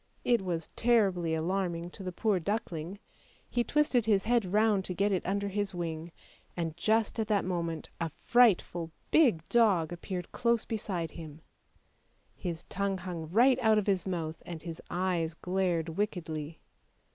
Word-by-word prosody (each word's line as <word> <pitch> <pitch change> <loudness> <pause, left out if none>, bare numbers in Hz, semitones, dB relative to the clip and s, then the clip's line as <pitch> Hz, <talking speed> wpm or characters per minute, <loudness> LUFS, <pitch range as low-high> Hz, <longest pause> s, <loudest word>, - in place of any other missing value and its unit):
It 240 -3 +3
was 170 -4 -3
terribly 195 -9 +2
alarming 175 0 -1
to - - -8
the 185 -1 -4
poor 200 +1 +1
duckling. 180 -2 -3 0.5
He 240 - +2
twisted 275 -5 +2
his 200 -3 +3
head 235 -2 +2
round 210 -1 +3
to 180 - -4
get 200 +3 +2
it 185 - 0
under 200 +1 0
his 200 -1 -2
wing, 165 -1 -4 0.5
and 165 -2 -2
just 220 +5 +1
at 220 - 0
that 205 -4 +1
moment 170 -3 -3
a 165 -1 -1
frightful, 195 -8 +3 0.2
big 235 - +4
dog 195 -9 +3
appeared 180 0 -5
close 235 -1 +1
beside 190 -8 -3
him; 160 -2 -10 0.9
his 170 -3 -4
tongue 200 0 -2
hung 175 -3 -6
right 245 +7 +5
out 220 -2 +4
of 210 - +1
his 195 -3 +1
mouth 165 -3 -3
and 165 -3 -7
his 165 -1 -6
eyes 175 -3 -1
glared 180 -2 0
wickedly. 160 -4 -3
185 Hz, 155 wpm, -30 LUFS, 165-210 Hz, 0.9 s, right